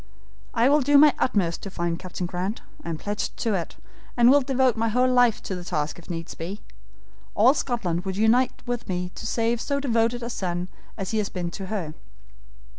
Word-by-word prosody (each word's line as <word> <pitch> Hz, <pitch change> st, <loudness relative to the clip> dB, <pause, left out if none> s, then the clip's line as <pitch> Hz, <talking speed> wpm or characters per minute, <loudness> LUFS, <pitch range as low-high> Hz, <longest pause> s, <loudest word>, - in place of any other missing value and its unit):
I 235 Hz, -, +4 dB
will 290 Hz, +2 st, +4 dB
do 285 Hz, +2 st, +5 dB
my 295 Hz, 0 st, +7 dB
utmost 180 Hz, -9 st, +1 dB
to 195 Hz, -, -6 dB
find 170 Hz, -2 st, -2 dB
Captain 185 Hz, -1 st, -5 dB
Grant; 185 Hz, +5 st, -3 dB, 0.2 s
I -, -, -5 dB
am 165 Hz, -, -2 dB
pledged 205 Hz, +5 st, -4 dB
to 225 Hz, -, 0 dB
it, 175 Hz, -4 st, -3 dB, 0.4 s
and 240 Hz, +1 st, +7 dB
will 285 Hz, +1 st, +6 dB
devote 260 Hz, -2 st, +2 dB
my 225 Hz, 0 st, 0 dB
whole 250 Hz, +3 st, +3 dB
life 245 Hz, -3 st, +3 dB
to -, -, -4 dB
the 180 Hz, -1 st, -5 dB
task 150 Hz, -2 st, -2 dB
if 170 Hz, -, -16 dB
needs 165 Hz, -1 st, -5 dB
be. 185 Hz, +6 st, -6 dB, 0.7 s
All 240 Hz, +6 st, +6 dB
Scotland 200 Hz, -, -1 dB
would 190 Hz, 0 st, -4 dB
unite 235 Hz, +4 st, +2 dB
with 240 Hz, -3 st, -4 dB
me 180 Hz, -1 st, -2 dB
to -, -, -6 dB
save 230 Hz, 0 st, 0 dB
so 280 Hz, -1 st, -1 dB
devoted 235 Hz, -2 st, +1 dB
a 235 Hz, -, -3 dB
son 180 Hz, -3 st, -3 dB, 0.3 s
as 195 Hz, -3 st, -4 dB
he 220 Hz, -, +1 dB
has 205 Hz, -, -1 dB
been 175 Hz, -2 st, -4 dB
to 195 Hz, 0 st, -6 dB
her. 185 Hz, -7 st, -3 dB
215 Hz, 205 wpm, -25 LUFS, 180-245 Hz, 0.7 s, my